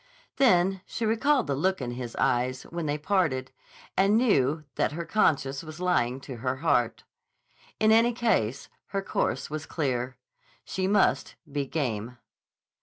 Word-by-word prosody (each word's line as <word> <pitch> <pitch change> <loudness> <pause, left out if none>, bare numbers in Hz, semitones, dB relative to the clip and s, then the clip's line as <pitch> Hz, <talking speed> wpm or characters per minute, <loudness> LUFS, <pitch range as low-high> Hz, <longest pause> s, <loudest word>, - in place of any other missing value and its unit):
Then 190 -7 +4
she 230 - -3
recalled 250 +4 +2
the 140 - -1
look 190 +7 0
in 125 -3 -4
his 120 -1 -6
eyes 125 +1 0
when 170 -2 -5
they 145 +1 0
parted, 150 -7 0 0.4
and 195 +3 +4
knew 155 - +2
that - - 0
her 170 +2 -4
conscience 140 -9 +1
was 155 +1 -9
lying 135 -9 +1
to 130 -2 -8
her 130 +2 -1
heart. 120 -3 +1 0.8
In 215 0 +4
any 230 +2 +5
case, 140 - 0 0.2
her 195 0 -3
course 185 - -1
was 155 0 -5
clear. 130 -4 -2 0.5
She 190 0 -2
must 205 +1 +2 0.2
be 140 -1 -2
game. 125 -5 -3
155 Hz, 150 wpm, -27 LUFS, 130-195 Hz, 0.8 s, any